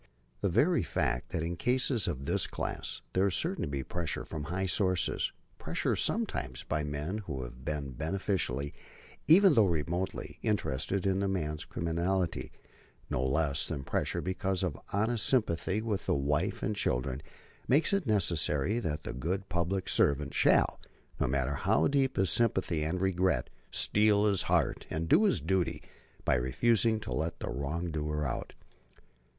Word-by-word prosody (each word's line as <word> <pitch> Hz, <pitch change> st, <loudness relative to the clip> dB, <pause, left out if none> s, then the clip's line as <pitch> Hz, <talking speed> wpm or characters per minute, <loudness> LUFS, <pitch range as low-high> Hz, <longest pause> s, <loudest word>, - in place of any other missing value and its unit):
The -, -, +1 dB
very -, -, +3 dB
fact -, -, -1 dB
that 80 Hz, -, -2 dB
in 85 Hz, +1 st, -2 dB
cases 125 Hz, +3 st, +1 dB
of 70 Hz, -6 st, -3 dB
this -, -, +1 dB
class -, -, -4 dB
there 95 Hz, +2 st, +3 dB
is 95 Hz, -, +1 dB
certain 185 Hz, +4 st, -1 dB
to -, -, -1 dB
be 70 Hz, -2 st, -3 dB
pressure 85 Hz, +2 st, -3 dB
from 75 Hz, -2 st, -5 dB
high 90 Hz, +4 st, -2 dB
sources, 95 Hz, 0 st, +1 dB, 0.3 s
pressure -, -, -1 dB
sometimes 65 Hz, -2 st, -1 dB
by 75 Hz, 0 st, -1 dB
men 75 Hz, +8 st, -3 dB
who 75 Hz, -11 st, -5 dB
have -, -, -10 dB
been 70 Hz, -2 st, -3 dB
beneficially, 80 Hz, -, -1 dB, 0.5 s
even 185 Hz, +2 st, +7 dB
though 110 Hz, -6 st, +5 dB
remotely, 85 Hz, +2 st, -2 dB
interested 85 Hz, +9 st, -1 dB
in 95 Hz, 0 st, +2 dB
the 100 Hz, -, 0 dB
man's 75 Hz, -6 st, -2 dB
criminality, 85 Hz, +2 st, -1 dB, 0.6 s
no 65 Hz, -, 0 dB
less 70 Hz, +1 st, +1 dB
than 70 Hz, -5 st, -4 dB
pressure -, -, -1 dB
because 95 Hz, 0 st, -1 dB
of 85 Hz, -6 st, -1 dB, 0.2 s
honest 110 Hz, +3 st, +1 dB
sympathy 105 Hz, -4 st, +1 dB
with 105 Hz, -5 st, -2 dB
the -, -, +2 dB
wife 75 Hz, +7 st, 0 dB
and 105 Hz, -, 0 dB
children, 65 Hz, -6 st, -1 dB, 0.5 s
makes 150 Hz, +9 st, +3 dB
it 200 Hz, -8 st, +1 dB
necessary 90 Hz, -, +1 dB
that 75 Hz, -8 st, -3 dB
the -, -, -5 dB
good 90 Hz, +10 st, -3 dB
public 90 Hz, +2 st, -1 dB
servant 70 Hz, 0 st, +2 dB
shall, -, -, +3 dB, 0.4 s
no -, -, +1 dB
matter 70 Hz, +1 st, 0 dB
how 75 Hz, +2 st, +2 dB
deep 135 Hz, -2 st, +1 dB
his 95 Hz, -2 st, +3 dB
sympathy 95 Hz, -8 st, +1 dB
and 80 Hz, +4 st, -1 dB
regret, 95 Hz, -1 st, +1 dB, 0.2 s
steel 105 Hz, 0 st, +4 dB
his 100 Hz, -4 st, +3 dB
heart -, -, +1 dB
and 80 Hz, +1 st, -2 dB
do 185 Hz, -, +5 dB
his 200 Hz, -, +4 dB
duty 95 Hz, -2 st, 0 dB, 0.5 s
by -, -, +3 dB
refusing 110 Hz, -, +2 dB
to 85 Hz, -, -7 dB
let 80 Hz, +6 st, -2 dB
the -, -, -4 dB
wrong 80 Hz, +6 st, -3 dB
doer 75 Hz, -1 st, -2 dB
out. 65 Hz, -, -4 dB
85 Hz, 160 wpm, -31 LUFS, 75-100 Hz, 0.6 s, even